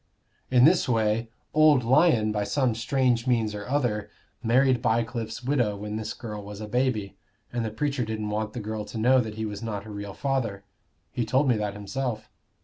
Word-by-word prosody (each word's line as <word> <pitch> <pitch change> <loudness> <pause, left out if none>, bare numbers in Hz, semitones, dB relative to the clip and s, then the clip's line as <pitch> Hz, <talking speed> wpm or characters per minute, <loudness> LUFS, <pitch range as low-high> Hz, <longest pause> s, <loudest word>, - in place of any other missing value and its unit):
"In 125 0 +6
this 170 -3 +4
way. 115 0 +1 0.2
Old 155 -4 +5
Lyon, 125 -4 +4
by 105 -1 -1
some 120 +4 +1
strange 125 +1 +1
means 115 -4 +1
or 105 0 -6
other, 115 -7 0 0.3
married 125 +2 +3
Bycliffe's 115 0 -1
widow 120 -6 +1
when 105 +1 -5
this 110 0 -4
girl 105 -4 -6
was 105 0 -8
a 110 - -6
baby. 115 -4 -1 0.4
And 120 -1 -1
the 110 - -2
preacher 140 +3 -1
didn't 110 -1 -3
want 110 0 -2
the - - -4
girl 110 0 -4
to 115 - -7
know 125 +4 +4
that 110 -2 -5
he 110 0 -3
was 105 -1 -5
not 105 -3 -4
her 110 - -10
real 100 -1 -6
father: 120 -8 -2 0.5
he 120 - -1
told 130 +6 +2
me 125 - +4
that 105 -1 -2
himself. 110 +1 -4
115 Hz, 195 wpm, -26 LUFS, 105-130 Hz, 0.5 s, In